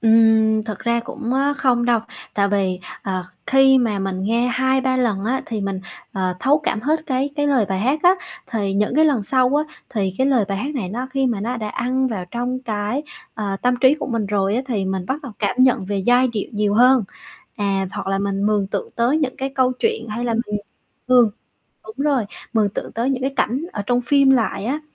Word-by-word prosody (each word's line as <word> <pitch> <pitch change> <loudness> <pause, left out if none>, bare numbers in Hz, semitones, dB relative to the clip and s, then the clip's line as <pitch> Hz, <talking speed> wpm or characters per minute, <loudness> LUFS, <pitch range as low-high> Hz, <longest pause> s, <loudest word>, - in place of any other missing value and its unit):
Ừm, 220 -1 +4
thực 215 -3 -5
ra 235 0 0
cũng, 245 +1 -5
a, 280 +2 +2
không 250 -4 +1
đâu, 240 -2 +3 0.3
tại 200 -1 +2
vì, 190 -2 0 0.2
ờ, 185 -4 -3 0.2
khi 270 0 +5
mà 220 -5 0
mình 190 -1 -3
nghe 230 +4 +1
2-3 260 +1 +1
lần 215 -6 0
á 260 +3 0
thì 220 -3 -3
mình, 195 -1 -3 0.3
ờ, 185 -2 -1
thấu 290 +3 +3
cảm 215 - -1
hết 305 +6 0
cái 270 0 0
cái 290 0 +1
lời 265 -6 +3
bài 190 -1 -1
hát 265 +8 +1
á, 360 +1 +6 0.4
thì 205 -4 -1
những 210 +4 0
cái 315 - +5
lần 275 -8 +2
sau 255 +4 +2
á, 305 +1 -2
thì 195 -6 -2
cái 265 - +3
lời 255 -6 +3
bài 195 - -2
hát 285 +8 -3
này 205 -9 -3
nó 245 +6 -4
khi 270 -1 +1
mà 225 -5 -1
nó 245 +4 -2
đã 215 -2 -4
ăn 260 +4 0
vào 195 -7 -4
trong 245 +2 -2
cái, 215 +4 -2 0.3
ờ, 200 -3 -3
tâm 250 0 +3
trí 265 +1 +6
của 305 - -5
mình 230 -5 -1
rồi 200 0 0
á 255 - 0
thì 210 -7 -1
mình 190 -1 -3
bắt 285 +3 -2
đầu 265 -6 -8
cảm 205 +1 -1
nhận 255 -6 +4
về 200 0 -2
giai 245 +5 +3
điệu 220 -4 -3
nhiều 205 -1 0
hơn. 250 -1 +5 0.5
À, 195 -2 0
hoặc 205 - -5
là 195 0 0
mình 200 0 -1
mường 205 -2 +1
tượng - - -4
tới 245 +6 +2
những 275 -4 -2
cái 270 +1 -2
câu 255 -1 +2
chuyện, 445 - -1
hay 230 +3 -3
là 230 -1 0
mình 210 0 -2 0.5
mường 245 -3 +6 0.6
đúng 440 - -10
rồi, 270 -7 +2 0.3
mường 215 -3 +2
tượng - - -6
tới 240 +4 -1
những 255 -1 -2
cái 270 +1 -1
cảnh 260 +5 0
ở 205 - -3
trong 245 +2 +2
phim 275 +2 +4
lại 225 -6 +1
á. 275 +7 -1
235 Hz, 230 wpm, -21 LUFS, 205-260 Hz, 0.6 s, á